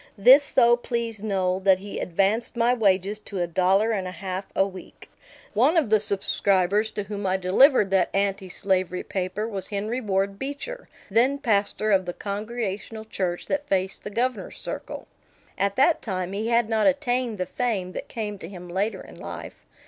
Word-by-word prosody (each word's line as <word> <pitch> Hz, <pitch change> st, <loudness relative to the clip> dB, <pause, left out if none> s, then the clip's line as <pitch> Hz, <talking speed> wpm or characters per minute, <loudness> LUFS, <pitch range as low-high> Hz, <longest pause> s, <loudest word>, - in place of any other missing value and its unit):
This 260 Hz, +8 st, +8 dB
so 240 Hz, -4 st, +4 dB
pleased 235 Hz, -3 st, -3 dB
Noel 190 Hz, -3 st, 0 dB
that 190 Hz, -1 st, +4 dB
he 200 Hz, +2 st, -7 dB
advanced 200 Hz, +7 st, 0 dB
my 235 Hz, +1 st, +3 dB
wages 200 Hz, -2 st, +1 dB
to 200 Hz, -2 st, -6 dB
a 175 Hz, -, +1 dB
dollar 190 Hz, +6 st, +2 dB
and 195 Hz, -4 st, -1 dB
a -, -, -5 dB
half 190 Hz, -1 st, -4 dB
a 195 Hz, -, +4 dB
week. 190 Hz, -2 st, -11 dB, 0.4 s
One 265 Hz, -, +3 dB
of 280 Hz, -10 st, +2 dB
the 215 Hz, -, +6 dB
subscribers 200 Hz, 0 st, +2 dB
to 205 Hz, -, -3 dB
whom 200 Hz, 0 st, -4 dB
I 185 Hz, +1 st, +1 dB
delivered 195 Hz, +3 st, +4 dB
that 190 Hz, -2 st, +3 dB
anti 195 Hz, -1 st, -1 dB
slavery 185 Hz, -1 st, 0 dB
paper 190 Hz, +3 st, -3 dB
was 195 Hz, -4 st, -4 dB
Henry 215 Hz, +5 st, -3 dB
Ward 195 Hz, -2 st, -1 dB
Beecher, 290 Hz, -, -6 dB, 0.2 s
then 250 Hz, +6 st, +3 dB
pastor 215 Hz, -3 st, 0 dB
of 190 Hz, -2 st, +3 dB
the 175 Hz, -, -3 dB
Congregational 215 Hz, +1 st, -4 dB
Church 185 Hz, -5 st, -3 dB
that 290 Hz, 0 st, -2 dB
faced 190 Hz, 0 st, -1 dB
the -, -, -5 dB
Governor's 235 Hz, -1 st, -2 dB
Circle. -, -, -6 dB, 0.5 s
At 200 Hz, +1 st, 0 dB
that 290 Hz, +5 st, +3 dB
time 185 Hz, -4 st, -3 dB
he 215 Hz, +3 st, -2 dB
had 235 Hz, -1 st, +2 dB
not 220 Hz, +1 st, +2 dB
attained 255 Hz, -5 st, 0 dB
the 185 Hz, -, -2 dB
fame 195 Hz, -2 st, -2 dB
that -, -, -6 dB
came 210 Hz, -3 st, -5 dB
to 165 Hz, -, -8 dB
him 180 Hz, -2 st, -10 dB
later 195 Hz, +5 st, -1 dB
in -, -, -13 dB
life. -, -, -9 dB
205 Hz, 180 wpm, -25 LUFS, 190-230 Hz, 0.5 s, This